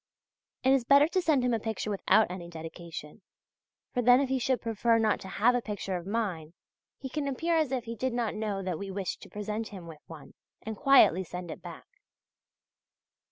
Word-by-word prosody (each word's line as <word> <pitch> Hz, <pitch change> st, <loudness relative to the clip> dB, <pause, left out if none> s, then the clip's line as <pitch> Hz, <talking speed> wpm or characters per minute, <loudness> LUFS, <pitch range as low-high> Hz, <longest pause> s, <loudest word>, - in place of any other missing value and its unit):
It 260 Hz, +1 st, +5 dB
is 270 Hz, -3 st, +3 dB
better 280 Hz, +4 st, +6 dB
to 370 Hz, +1 st, +1 dB
send 300 Hz, -7 st, +2 dB
him 245 Hz, -, +1 dB
a 225 Hz, -, +1 dB
picture 220 Hz, -1 st, -3 dB
without 200 Hz, 0 st, +3 dB
any 175 Hz, -2 st, -7 dB
dedication; 165 Hz, +1 st, -9 dB, 0.7 s
for 250 Hz, -, +1 dB
then 245 Hz, +1 st, +6 dB
if 275 Hz, -2 st, 0 dB
he 265 Hz, 0 st, +1 dB
should 255 Hz, +1 st, +1 dB
prefer 230 Hz, 0 st, +1 dB
not 220 Hz, -2 st, +2 dB
to 195 Hz, -, -9 dB
have 220 Hz, +6 st, +2 dB
a 245 Hz, -, +1 dB
picture 205 Hz, -3 st, -4 dB
of 175 Hz, 0 st, -5 dB
mine 185 Hz, -7 st, -3 dB, 0.4 s
he 270 Hz, -, -6 dB
can 285 Hz, +2 st, -3 dB
appear 330 Hz, +5 st, 0 dB
as 310 Hz, -5 st, +1 dB
if 255 Hz, -3 st, -1 dB
he 230 Hz, 0 st, -6 dB
did 260 Hz, +4 st, -1 dB
not 235 Hz, -2 st, -1 dB
know 210 Hz, -3 st, -3 dB
that 180 Hz, -4 st, -3 dB
we 200 Hz, -, -5 dB
wished 190 Hz, -1 st, -4 dB
to -, -, -12 dB
present 210 Hz, +3 st, -4 dB
him 190 Hz, -4 st, -10 dB
with 160 Hz, -3 st, -11 dB
one 160 Hz, -3 st, -12 dB, 0.3 s
and 220 Hz, 0 st, -5 dB
quietly 205 Hz, -7 st, +5 dB
send 180 Hz, -1 st, -7 dB
it -, -, -9 dB
back. -, -, -10 dB
220 Hz, 205 wpm, -29 LUFS, 185-250 Hz, 0.7 s, better